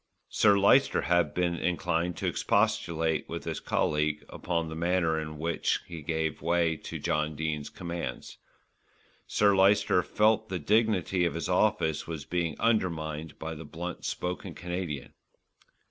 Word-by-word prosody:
Sir 100 Hz, -2 st, +4 dB
Lyster 135 Hz, +8 st, +4 dB
had 85 Hz, -4 st, +2 dB
been 90 Hz, -1 st, +1 dB
inclined 90 Hz, -1 st, -1 dB
to -, -, -3 dB
expostulate 80 Hz, -1 st, +1 dB
with -, -, -5 dB
his -, -, -3 dB
colleague 75 Hz, 0 st, 0 dB
upon 85 Hz, -2 st, -2 dB
the 80 Hz, -, -6 dB
manner 85 Hz, -1 st, +1 dB
in 75 Hz, 0 st, -7 dB
which 85 Hz, +2 st, 0 dB
he 85 Hz, -2 st, -8 dB
gave 80 Hz, +1 st, -2 dB
way 85 Hz, 0 st, +2 dB
to -, -, -7 dB
John 75 Hz, 0 st, -1 dB
Dene's 75 Hz, -1 st, -3 dB
demands. 85 Hz, -2 st, -6 dB, 0.9 s
Sir 100 Hz, -1 st, +3 dB
Lyster 95 Hz, -1 st, +4 dB
felt 110 Hz, +3 st, +2 dB
that 95 Hz, -, -3 dB
the 80 Hz, -5 st, -5 dB
dignity 105 Hz, -4 st, +2 dB
of 85 Hz, -, 0 dB
his 85 Hz, -, -3 dB
office 90 Hz, -4 st, +1 dB
was 80 Hz, -4 st, -5 dB
being 85 Hz, -4 st, -2 dB
undermined 80 Hz, -8 st, -1 dB
by 80 Hz, 0 st, -5 dB
the 80 Hz, +1 st, -8 dB
blunt 85 Hz, +3 st, -6 dB
spoken 90 Hz, 0 st, -4 dB
Canadian. 90 Hz, -4 st, -5 dB
85 Hz, 145 wpm, -29 LUFS, 80-90 Hz, 0.9 s, Sir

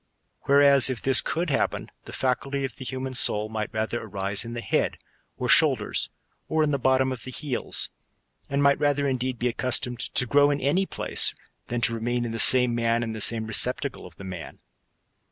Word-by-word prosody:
Whereas 140 Hz, -2 st, +6 dB
if 130 Hz, -3 st, -4 dB
this 135 Hz, -1 st, +3 dB
could 165 Hz, 0 st, -3 dB
happen, 135 Hz, -, -2 dB
the -, -, -10 dB
faculty 135 Hz, +2 st, -2 dB
of 130 Hz, -, -7 dB
the -, -, -10 dB
human 130 Hz, 0 st, -5 dB
soul 110 Hz, -4 st, +2 dB
might 110 Hz, -1 st, -5 dB
rather 110 Hz, +2 st, -3 dB
arise 100 Hz, -1 st, 0 dB
in 115 Hz, 0 st, -8 dB
the 120 Hz, -, -5 dB
head, -, -, -1 dB, 0.4 s
or -, -, -3 dB
shoulders, -, -, +2 dB, 0.4 s
or 160 Hz, 0 st, +1 dB
in 150 Hz, -, 0 dB
the 140 Hz, -, -1 dB
bottom 130 Hz, +1 st, +1 dB
of 125 Hz, -3 st, -6 dB
the -, -, -6 dB
heels, 130 Hz, 0 st, -2 dB, 0.6 s
and 140 Hz, +1 st, 0 dB
might 140 Hz, 0 st, +3 dB
rather 145 Hz, -1 st, 0 dB
indeed 130 Hz, -1 st, -2 dB
be 125 Hz, -, -1 dB
accustomed 125 Hz, 0 st, -1 dB
to 125 Hz, -, 0 dB
grow 145 Hz, +4 st, +3 dB
in 145 Hz, 0 st, -1 dB
any 175 Hz, +9 st, 0 dB
place, -, -, +1 dB, 0.3 s
than 120 Hz, 0 st, -3 dB
to 115 Hz, -, +2 dB
remain 120 Hz, +1 st, -2 dB
in 115 Hz, -, -5 dB
the 115 Hz, -, -5 dB
same 125 Hz, 0 st, +6 dB
man 115 Hz, 0 st, 0 dB
and 115 Hz, -1 st, -5 dB
the 110 Hz, -, -7 dB
same 110 Hz, 0 st, +2 dB
receptacle 125 Hz, +5 st, -2 dB
of -, -, -18 dB
the -, -, -12 dB
man. 95 Hz, -1 st, -9 dB
125 Hz, 200 wpm, -24 LUFS, 115-140 Hz, 0.6 s, Whereas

